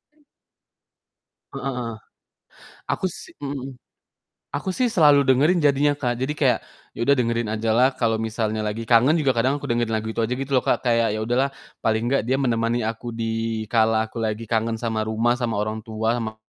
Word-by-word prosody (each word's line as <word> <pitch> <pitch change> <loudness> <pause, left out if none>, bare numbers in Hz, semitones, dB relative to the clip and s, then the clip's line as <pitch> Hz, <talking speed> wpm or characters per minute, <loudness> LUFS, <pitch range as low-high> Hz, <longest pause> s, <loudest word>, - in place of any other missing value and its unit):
M 300 - -31 1.3
Heeh 135 -1 -3
heeh. 115 -2 -3 1.0
Aku - - 0
si 180 - -7
mhm 140 -1 -4
mhm. 135 -1 -6 0.9
Aku 155 - -12
sih 250 -2 +1
selalu 145 -7 +5
dengerin 150 +6 +3
jadinya, 145 0 +3
Kak. 120 -4 -2
Jadi 145 +3 -2
kayak 130 -6 +2 0.3
ya - - -13
udah 140 - +6
dengerin 115 -2 0
aja 110 0 0
lah 125 +3 +5
kalo 115 -3 0
misalnya 110 -1 -2
lagi 110 +2 -3
kangen 120 +6 +4
juga 145 -5 +2
kadang 130 +3 +1
aku 145 - -7
dengerin 120 -1 0
lagu 110 0 -2
itu 110 - -5
aja 115 +2 0
gitu 135 +1 -5
loh, 130 - +4
Kak, - - +1
kayak, 115 -3 +2
ya 110 - -2
udah 120 +2 0
lah, - - -10 0.3
paling 110 0 0
nggak 140 - +3
dia 130 - +2
menemani 120 -3 0
aku 115 +1 -4
di 115 -1 -2
kala 110 -1 +3
aku 115 - -6
lagi 110 0 -2
kangen 115 0 +1
sama 110 -1 -2
rumah, 120 +3 +1
sama 120 -2 -1
orang 110 +1 -2
tua, 110 +1 -1
sama 110 -1 -5
115 Hz, 195 wpm, -23 LUFS, 110-135 Hz, 1.3 s, udah